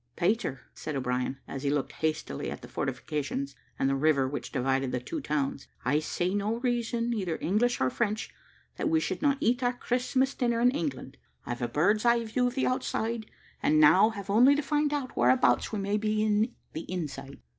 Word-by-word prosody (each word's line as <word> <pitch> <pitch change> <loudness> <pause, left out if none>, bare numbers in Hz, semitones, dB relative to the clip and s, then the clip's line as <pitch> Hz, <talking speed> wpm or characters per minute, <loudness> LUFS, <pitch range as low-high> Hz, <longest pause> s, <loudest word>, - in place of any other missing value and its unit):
"Peter," 175 - 0
said 155 - -5
O'Brien, 125 0 -1
as 135 - -5
he 140 - 0
looked 145 -1 0
hastily 155 - -2
at - - -7
the - - -8
fortifications 140 -2 -3 0.2
and 135 - +1
the 135 - +2
river 140 -1 +3
which 145 +2 -5
divided 135 0 0
the 125 - -1
two 125 - -5
towns, 140 -2 -2 0.2
"I 140 +4 +3
see 175 +4 -1
no 205 +2 0
reason, 240 -1 0
either 185 -7 -2
English 235 +7 +1
or 130 0 +1
French, 215 -1 -2 0.4
that - - 0
we 320 0 +3
should - - -3
not 285 -2 +3
eat 245 +3 +1
our 245 0 +2
Christmas 255 +2 0
dinner 235 -2 0
in 245 +1 +5
England. 140 - -4 0.3
I've 120 0 -4
a 120 - 0
bird's 180 - +2
eye 235 -1 +3
view 245 +3 +1
of 245 - -4
the 265 - +1
outside, 230 -3 -1 0.3
and 155 0 +3
now 185 +8 +7
have 200 -3 -6
only 250 +7 +6
to 295 - -1
find 295 +1 +1
out 280 -4 -3
whereabouts 260 0 +3
we 215 - -2
may 200 +1 0
be 215 0 0
in 215 +2 +1 0.2
the 160 +3 -6
inside." 150 -6 -5
205 Hz, 200 wpm, -29 LUFS, -, 0.4 s, now